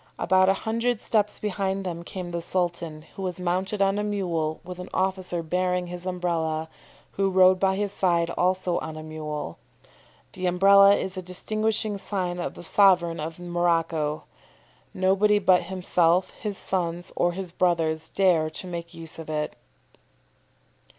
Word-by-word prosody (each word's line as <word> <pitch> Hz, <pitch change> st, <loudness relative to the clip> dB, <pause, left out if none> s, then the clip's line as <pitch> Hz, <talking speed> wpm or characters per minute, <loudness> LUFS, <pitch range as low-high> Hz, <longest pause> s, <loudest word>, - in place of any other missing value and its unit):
About 185 Hz, 0 st, +3 dB
a 195 Hz, -, +4 dB
hundred 230 Hz, +1 st, 0 dB
steps 210 Hz, -2 st, 0 dB
behind 195 Hz, -1 st, -2 dB
them 170 Hz, -2 st, -4 dB
came 175 Hz, 0 st, -6 dB
the 170 Hz, 0 st, -3 dB
Sultan, 170 Hz, -3 st, -2 dB
who -, -, -7 dB
was 185 Hz, -1 st, -3 dB
mounted 185 Hz, +3 st, 0 dB
on 195 Hz, +1 st, +1 dB
a -, -, -1 dB
mule 175 Hz, -7 st, -1 dB
with 180 Hz, 0 st, -8 dB
an 180 Hz, -, -7 dB
officer 185 Hz, -2 st, -1 dB
bearing 180 Hz, +2 st, 0 dB
his 175 Hz, +1 st, -6 dB
Umbrella, 165 Hz, -3 st, -1 dB, 0.4 s
who 195 Hz, 0 st, 0 dB
rode 185 Hz, 0 st, +5 dB
by 190 Hz, 0 st, +2 dB
his 205 Hz, 0 st, -1 dB
side 170 Hz, -4 st, +1 dB
also 180 Hz, 0 st, 0 dB
on 160 Hz, 0 st, -6 dB
a 155 Hz, -, -7 dB
mule. 150 Hz, -, -6 dB, 0.7 s
The 185 Hz, -1 st, -2 dB
Umbrella 200 Hz, +2 st, +6 dB
is 190 Hz, -1 st, -3 dB
a -, -, -2 dB
distinguishing 215 Hz, +3 st, -1 dB
sign 180 Hz, -3 st, -3 dB
of 175 Hz, -, -4 dB
the -, -, -10 dB
sovereign 175 Hz, -3 st, +4 dB
of 160 Hz, +1 st, -5 dB
Morocco. 165 Hz, -3 st, 0 dB, 0.7 s
Nobody 195 Hz, +3 st, +3 dB
but 185 Hz, -3 st, +4 dB
himself, 180 Hz, -1 st, +1 dB
his 205 Hz, -2 st, -5 dB
sons, 175 Hz, -2 st, -3 dB
or 175 Hz, 0 st, +1 dB
his 185 Hz, -1 st, -5 dB
brothers 165 Hz, -3 st, +1 dB
dare 175 Hz, -5 st, +2 dB
to 155 Hz, -, -7 dB
make 170 Hz, -1 st, -6 dB
use 165 Hz, -1 st, -6 dB
of 160 Hz, -, -8 dB
it." 150 Hz, -1 st, -2 dB
180 Hz, 155 wpm, -25 LUFS, 170-190 Hz, 0.7 s, Umbrella